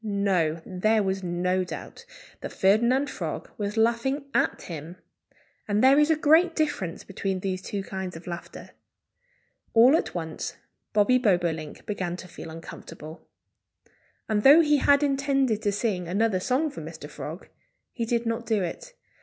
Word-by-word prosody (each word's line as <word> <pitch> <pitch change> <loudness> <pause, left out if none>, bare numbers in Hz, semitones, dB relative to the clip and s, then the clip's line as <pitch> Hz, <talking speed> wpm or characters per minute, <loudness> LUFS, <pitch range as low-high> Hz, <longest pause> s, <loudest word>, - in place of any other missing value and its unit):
No! 190 -6 0
There 215 +4 +1
was 190 0 -1
no 180 +1 0
doubt 180 - -8 0.3
that - - -6
Ferdinand 235 +8 +3
Frog - - -5
was 205 +1 -3
laughing 235 +5 +1
at - - +1
him. 165 0 -7 0.7
And 210 +2 +1
there 270 +2 +7
is 300 +1 +4
a 320 - +5
great 320 +3 +4
difference 295 - -2
between 195 -1 -3
these 185 -1 -2
two 200 +1 -4
kinds 190 -2 -5
of 165 - -10
laughter. 175 0 -8 1.0
All 245 +6 +7
at 325 - -1
once 160 -2 -4 0.4
Bobby 220 +4 +4
Bobolink 175 -8 0
began 185 -4 -3
to 185 - -10
feel 170 -1 -10
uncomfortable. 160 -1 -10 1.0
And 215 -2 +1
though 285 +8 +8
he 300 -2 +3
had 285 +1 +4
intended 275 -5 +1
to 205 - +1
sing 200 -4 -2
another 200 +2 +1
song 265 +9 0
for - - -8
Mr. - - -8
Frog, - - -8 0.4
he 235 - -4
did 235 +1 0
not 230 0 -2
do 215 -4 +1
it. - - -6
210 Hz, 155 wpm, -26 LUFS, 180-260 Hz, 1.0 s, though